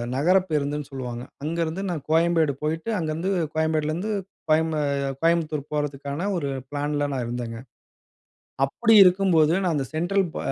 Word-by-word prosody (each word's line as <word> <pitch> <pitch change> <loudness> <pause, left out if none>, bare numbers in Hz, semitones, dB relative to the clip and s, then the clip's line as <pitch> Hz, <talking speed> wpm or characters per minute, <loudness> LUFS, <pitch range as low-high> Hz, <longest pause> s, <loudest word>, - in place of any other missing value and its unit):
நகர 175 +8 +4
பேருந்துன்னு 145 -1 -1
சொல்லுவாங்க. 125 -3 -5 0.2
அங்கருந்து 165 +3 -2
நான் 160 -5 -3
கோயம்பேடு 165 -2 +3
போயிட்டு, 160 +8 -2
அங்கருந்து 165 +3 -2 0.2
கோயம்பேடுலேருந்து, 160 +5 0 0.4
கோயம்பு 160 0 +2 0.4
கோயம்புத்தூர் 160 -3 +1
போறதுக்கான 145 +3 -3
ஒரு 145 -4 -2 0.2
ப்ளான்ல 145 0 -1
நான் 125 -2 -2
இருந்தேங்க. 120 -1 -4 1.1
அப்பிடி 225 +12 +2
இருக்கும்போது 180 -4 +4
நான் 180 -3 +1
அந்த 135 -2 -1
சென்ட்ரல், 185 +5 +1
ப - - -3
155 Hz, 125 wpm, -24 LUFS, 145-170 Hz, 1.1 s, நகர